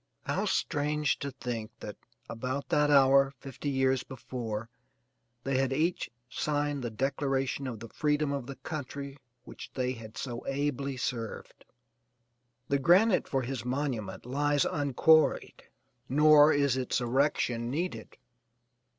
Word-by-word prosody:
How - - -1
strange 150 0 0
to 140 - -3
think 120 -4 -5
that - - -7 0.3
about 130 +4 -4
that 150 0 +3
hour 135 -1 +5
fifty 135 +2 -6
years 130 -1 +2
before 115 -4 -5 0.8
they 135 -1 0
had 135 -1 +1
each 160 +6 0 0.2
signed 145 0 -1
the 120 - -2
declaration 135 +2 -1
of 115 -4 -5
the 115 - -8
freedom 150 +1 0
of 140 -3 -3
the 140 - -6
country 140 -2 -6 0.2
which - - -10
they 125 -1 0
had 115 -3 -9
so 120 -3 -5
ably 140 -1 -2
served. 115 -3 -5 1.0
The 140 - +1
granite 180 +7 +4
for 135 -2 -1
his 125 -2 -4
monument 125 -7 -3
lies 145 +3 +1
unquarried 150 +2 +2 0.4
nor 150 +2 +7
is 140 -3 +2
its 130 -1 0
erection 120 -2 0
needed. 170 +8 -4
135 Hz, 130 wpm, -30 LUFS, 125-145 Hz, 1.0 s, nor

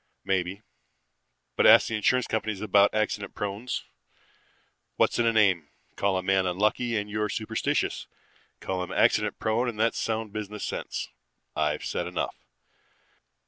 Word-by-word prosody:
Maybe; 95 +2 -1 0.9
but - - +4
ask - - +8
the 115 - -2
insurance 125 +4 +2
companies 110 -2 -2
about 100 -1 +4
accident 110 -1 -2
prones. 105 +5 -3 1.1
What's - - +2
in 120 - +3
a - - +4
name? 95 -9 +3 0.3
Call 100 -1 +1
a 95 - -2
man 95 0 +2
unlucky 105 +5 +1
and 105 0 -2
you're 105 0 -2
superstitious. 110 0 -1 0.5
Call 95 -1 -2
him 90 - -7
accident - - +2
prone 115 +3 0
and 110 -3 -7
that's 115 +1 +1
sound 110 -2 -2
business 105 -1 -5
sense. - - -4 0.5
I've 75 -1 0
said - - -2
enough. - - -3
105 Hz, 145 wpm, -27 LUFS, 95-110 Hz, 1.1 s, ask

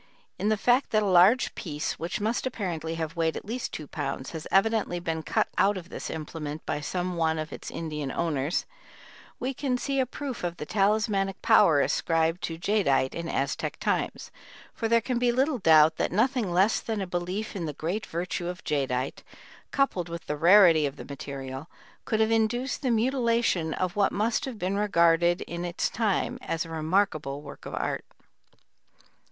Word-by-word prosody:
In 210 - +1
the 215 - +2
fact 245 +5 +3
that 215 -1 +2
a - - 0
large 190 +6 +5
piece, 150 -3 -4
which 170 +2 -3
must 225 +5 -1
apparently 170 - -3
have 165 0 -4
weighed 165 -1 0
at - - -8
least 235 +4 -4
two 155 - -6
pounds, 135 -1 -4
has 160 -2 -6
evidently 195 -3 +2
been 165 -2 -2
cut - - 0
out 200 0 +3
of 180 -1 -9
this - - -6
implement 155 -1 -6
by 150 - -2
some 180 +3 -3
one 160 -1 +1
of 155 0 -4
its - - -7
Indian 150 -4 -4
owners, 155 0 -1 0.7
we 260 +2 -2
can 255 -1 -1
see 275 +2 -1
a 260 - +2
proof 260 -3 -6
of 175 0 -2
the 150 - -5
talismanic 200 0 +1
power 150 -4 +6
ascribed 165 +3 +1
to 165 - -4
jadeite 165 -9 +1
in 170 0 -4
Aztec 140 - -2
times, - - -2 0.4
for 225 - -2
there 230 +1 +4
can 240 +1 -1
be 245 0 +3
little 265 +2 +1
doubt 160 -3 +6
that - - 0
nothing 225 0 +1
less 190 +5 +3
than 220 -2 -3
a 195 - -2
belief 180 +5 -3
in 180 -4 -3
the - - -2
great 175 +9 -3
virtue 175 +1 -3
of 180 +1 -6
jadeite 135 -3 -1 0.5
coupled 190 - 0
with 170 -1 -6
the 150 - -2
rarity 170 -2 +6
of 140 - -6
the - - -9
material 135 0 -7 0.4
could 220 - 0
have 220 0 +3
induced 235 +4 0
the 265 - 0
mutilation 230 -7 +1
of 185 +1 -2
what 200 -1 +3
must 215 +3 0
have 260 -4 -6
been 195 0 -1
regarded 175 -3 +3
in 170 0 -5
its 175 0 -1
time 215 -5 0
as 165 +1 -2
a 165 - -10
remarkable 155 -4 0
work 140 - -10
of - - -5
art. - - -2
180 Hz, 185 wpm, -27 LUFS, 160-220 Hz, 0.7 s, power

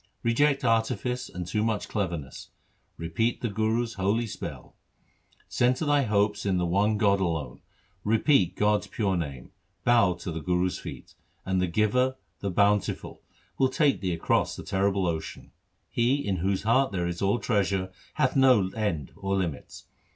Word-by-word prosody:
Reject 140 +4 +2
artifice 120 +2 0
and 90 0 -6
too 105 +5 -1
much 110 -2 -1
cleverness; 85 - -4 0.5
repeat 100 +9 -1
the 120 - -1
Guru's 110 +3 0
holy 100 +5 0
spell. 110 - -8 0.7
Centre 125 +5 +1
thy 145 -1 +3
hopes 105 -1 +1
in 95 -2 +1
the 90 - +1
one 100 +5 +2
God 100 -2 +3
alone; 80 -8 -2 0.4
Repeat 110 - +3
God's 105 0 +1
pure 100 -4 -1
name; 70 -7 -5 0.3
Bow 115 -7 +4
to 85 0 -6
the 80 0 -4
Guru's 90 +1 0
feet, - - -9 0.3
And 95 -1 0
the 90 - +1
Giver, 110 +8 +1 0.2
the 100 - -2
Bountiful, 100 +2 0 0.4
Will 130 - +4
take 140 +1 +2
thee 95 -2 -1
across 85 - 0
the - - -8
terrible 95 0 0
ocean. 80 -2 -4 0.4
He 120 +3 +1
in 100 -10 -2
whose 95 +2 -1
heart 130 +5 +3
there 90 -3 -1
is 85 0 -4
all 100 +3 +2
treasure 100 -4 0 0.2
Hath 130 - +1
no 130 -8 +5
end 95 -9 -2
or 95 0 -2
limits. 85 -6 -4
100 Hz, 160 wpm, -27 LUFS, 90-115 Hz, 0.7 s, no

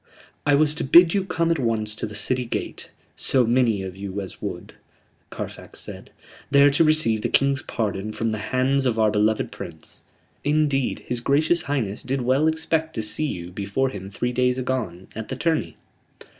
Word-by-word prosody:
"I 145 - +5
was 150 +1 +3
to 160 - -3
bid 170 +5 +7
you 195 - +1
come 170 -3 0
at 165 - +1
once 110 -3 0
to 110 - -4
the 105 - -9
City 125 +4 0
gate, 120 - -5 0.3
so 130 -2 +3
many 115 -4 +2
of 95 -1 -6
you 100 0 -5
as 95 -2 -7
would," 90 -4 -6 0.6
Carfax - - -8
said, - - -8 0.4
"there 140 0 +6
to 145 +4 +4
receive 155 -9 +3
the - - -1
King's 140 -1 +2
pardon 105 -2 -3
from 115 +1 -2
the 110 - -3
hands 135 +1 +2
of 115 -2 0
our 110 -1 +3
beloved 105 +1 +1
Prince. - - -9 0.4
Indeed, 145 -3 +1
his 125 - -2
gracious 155 +7 +2
Highness 125 -10 -2
did 130 +1 -2
well 130 +5 +2
expect 160 0 0
to 110 - -2
see 105 +9 -2
you 90 -8 -5
before 100 +8 -1
him 95 -5 -7
three 120 +5 -2
days 125 0 +2
agone, 125 -9 -3
at 110 0 -5
the 130 - -4
tourney." 160 +3 -1
125 Hz, 185 wpm, -23 LUFS, 105-145 Hz, 0.6 s, bid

